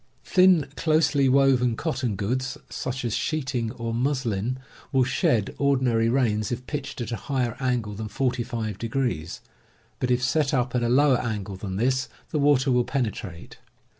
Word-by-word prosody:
Thin, 180 Hz, -5 st, +5 dB
closely 155 Hz, -4 st, +2 dB
woven 130 Hz, -3 st, +4 dB
cotton 130 Hz, -7 st, -2 dB
goods, 130 Hz, +7 st, -2 dB
such 130 Hz, 0 st, -4 dB
as 115 Hz, -, -1 dB
sheeting 130 Hz, -7 st, -1 dB
or 115 Hz, -2 st, -4 dB
muslin, 125 Hz, -3 st, -1 dB, 0.3 s
will 130 Hz, -1 st, +4 dB
shed 115 Hz, -4 st, +1 dB
ordinary 125 Hz, -5 st, +2 dB
rains 115 Hz, -4 st, +1 dB
if 125 Hz, +1 st, -4 dB
pitched 145 Hz, -3 st, -5 dB
at 115 Hz, -, -4 dB
a -, -, -1 dB
higher 125 Hz, -5 st, 0 dB
angle 125 Hz, -5 st, -1 dB
than 110 Hz, +1 st, -5 dB
45°, 115 Hz, -6 st, -2 dB, 0.6 s
but 125 Hz, -, -1 dB
if 125 Hz, 0 st, +2 dB
set 145 Hz, +2 st, +1 dB
up 125 Hz, -1 st, 0 dB
at 125 Hz, -, +1 dB
a 120 Hz, -, +1 dB
lower 135 Hz, 0 st, +4 dB
angle 105 Hz, -5 st, -4 dB
than 95 Hz, 0 st, -5 dB
this, 130 Hz, +5 st, 0 dB, 0.2 s
the 155 Hz, -, 0 dB
water 140 Hz, -2 st, +3 dB
will 125 Hz, -1 st, +3 dB
penetrate. 105 Hz, -10 st, -4 dB
125 Hz, 155 wpm, -25 LUFS, 115-135 Hz, 0.6 s, Thin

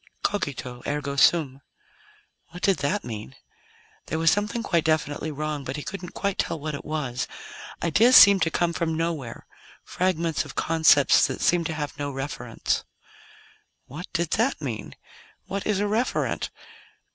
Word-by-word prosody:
Cogito, 130 Hz, -10 st, -3 dB
ergo 145 Hz, -1 st, -2 dB
sum. 140 Hz, -2 st, +3 dB, 0.9 s
What 180 Hz, +2 st, -12 dB
did 195 Hz, -2 st, +3 dB
that 165 Hz, +9 st, -1 dB
mean? 105 Hz, -, -7 dB, 0.7 s
There 160 Hz, -, -2 dB
was 165 Hz, 0 st, +4 dB
something 210 Hz, +4 st, -1 dB
quite 170 Hz, -6 st, +1 dB
definitely 155 Hz, -1 st, 0 dB
wrong, 150 Hz, -1 st, -4 dB
but 130 Hz, 0 st, -5 dB
he 150 Hz, -, -5 dB
couldn't 185 Hz, -2 st, -7 dB
quite 200 Hz, -1 st, -2 dB
tell 165 Hz, -, -1 dB
what 155 Hz, +1 st, -4 dB
it 140 Hz, -, -6 dB
was. 140 Hz, -5 st, -3 dB, 0.6 s
Ideas 225 Hz, +10 st, +5 dB
seemed 200 Hz, -2 st, +9 dB
to 165 Hz, -, +3 dB
come 170 Hz, +1 st, 0 dB
from 160 Hz, -1 st, -1 dB
nowhere; 160 Hz, -7 st, -3 dB, 0.4 s
fragments 170 Hz, -3 st, -1 dB
of -, -, -11 dB
concepts 160 Hz, -3 st, +4 dB
that -, -, -5 dB
seemed 170 Hz, -2 st, +2 dB
to 160 Hz, -, -4 dB
have 145 Hz, -2 st, -5 dB
no 145 Hz, -1 st, -2 dB
referents. 135 Hz, -4 st, -3 dB, 1.0 s
What 155 Hz, +7 st, -8 dB
did 170 Hz, -3 st, -1 dB
that 235 Hz, +6 st, +1 dB
mean? 125 Hz, -8 st, -5 dB, 0.5 s
What 200 Hz, 0 st, -4 dB
is 210 Hz, -2 st, +1 dB
a -, -, +1 dB
referent? 220 Hz, +4 st, -1 dB
160 Hz, 155 wpm, -25 LUFS, 140-180 Hz, 1.0 s, seemed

